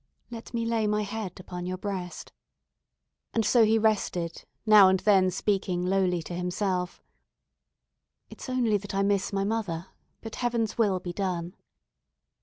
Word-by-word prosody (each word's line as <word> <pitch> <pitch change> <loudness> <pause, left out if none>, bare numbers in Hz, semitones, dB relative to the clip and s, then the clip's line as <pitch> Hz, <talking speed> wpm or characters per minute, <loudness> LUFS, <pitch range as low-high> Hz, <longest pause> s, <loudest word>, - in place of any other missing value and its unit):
"Let 230 -1 -8
me 230 -1 -2
lay 230 -2 0
my 210 0 +1
head 205 -3 -5
upon 180 -1 -6
your 185 0 -3
breast;" 185 -3 -5 1.0
and 225 -2 +2
so 235 +2 +5
he 220 +1 +4
rested, 195 -6 -1 0.2
now 210 -3 +8
and 190 0 +3
then 190 -3 +4
speaking 185 -2 -1
lowly 180 -2 +1
to 175 - -7
himself, 180 +1 -2 1.2
"It's - - -10
only 240 -5 +2
that 200 0 -7
I 195 - +2
miss 200 -1 +1
my 195 -1 0
mother; 195 -5 -2 0.3
but 225 -1 -8
Heaven's 235 -3 -1
will 205 -5 +2
be 175 -1 -6
done." 180 -2 -3
195 Hz, 150 wpm, -27 LUFS, 180-220 Hz, 1.2 s, now